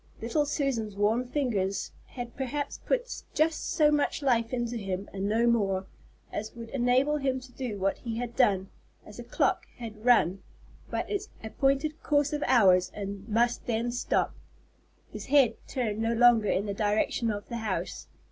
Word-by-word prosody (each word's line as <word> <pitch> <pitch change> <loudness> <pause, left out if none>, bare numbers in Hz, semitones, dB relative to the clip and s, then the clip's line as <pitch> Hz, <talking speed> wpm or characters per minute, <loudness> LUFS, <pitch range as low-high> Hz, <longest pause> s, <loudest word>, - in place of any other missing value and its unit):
Little 285 +6 0
Susan's 255 -8 -1
warm 215 +5 +2
fingers 220 -9 -1 0.2
had 245 -2 -7
perhaps 275 +2 -3
put - - -1
just 315 0 +1
so 300 -1 +4
much 295 0 0
life 230 -4 +2
into 240 -1 -2
him, 195 -3 -3
and 195 +1 -2
no 225 +2 +2
more, 195 -5 +2 0.5
as 215 +2 -5
would 230 -1 -8
enable 260 +3 +2
him 265 -2 0
to 255 0 -14
do 245 -4 -4
what 195 0 0
he 230 -2 -4
had 240 0 -4
done, 195 -7 +2 0.3
as - - -12
a - - -5
clock - - 0
can 220 -3 -8
run 195 -6 +4 0.5
but - - -2
its 410 0 -3
appointed 275 +7 0
course 290 0 +1
of 295 - -1
hours 190 -8 +5
and 200 +1 -6
must 235 +2 +1
then 235 +1 0
stop. 245 - 0 0.8
His - - -7
head 270 -5 +5
turned 220 -6 -2
no 225 +1 +1
longer 235 -2 +5
in 200 - +1
the 200 - -2
direction 210 +3 0
of 205 -1 -4
the 235 - -4
house. 215 -4 -3
235 Hz, 170 wpm, -28 LUFS, 210-270 Hz, 0.8 s, hours